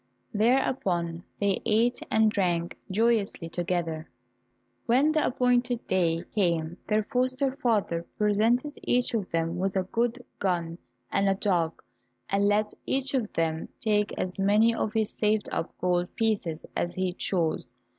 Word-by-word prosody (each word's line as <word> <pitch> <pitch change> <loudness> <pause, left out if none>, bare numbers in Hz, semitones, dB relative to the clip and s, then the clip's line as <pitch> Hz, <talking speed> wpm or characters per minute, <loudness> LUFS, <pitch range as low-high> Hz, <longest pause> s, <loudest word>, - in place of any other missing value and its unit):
Thereupon 200 -8 +1 0.2
they 200 -1 +1
ate 230 +3 +2
and 220 -1 +4
drank 175 -5 0
joyously 210 -4 +1
together. 170 -2 -2 0.8
When 265 +6 +4
the 310 -1 +2
appointed 245 -1 +1
day 170 -3 +1
came, 170 -4 0
their 215 0 +2
foster 255 +2 0
father 205 - 0
presented 225 +7 +2
each 245 0 +1
of 210 -5 -1
them 165 +1 -1
with 195 +1 -1
a 190 - +2
good 235 +5 -1
gun 170 -3 -1 0.3
and 195 0 +2
a 195 - +2
dog, 175 -5 0 0.5
and 200 +1 +3
let 210 +1 +2
each 270 +1 0
of 240 -6 0
them 160 -1 -1
take 210 -2 +1
as 185 +1 -3
many 210 +4 +4
of 220 - -1
his 220 -2 0
saved 215 0 +1
up 165 - -2
gold 180 -1 0
pieces 200 -8 -1
as 175 - -1
he 185 -1 -1
chose. 175 -3 -1
205 Hz, 145 wpm, -27 LUFS, 175-230 Hz, 0.8 s, and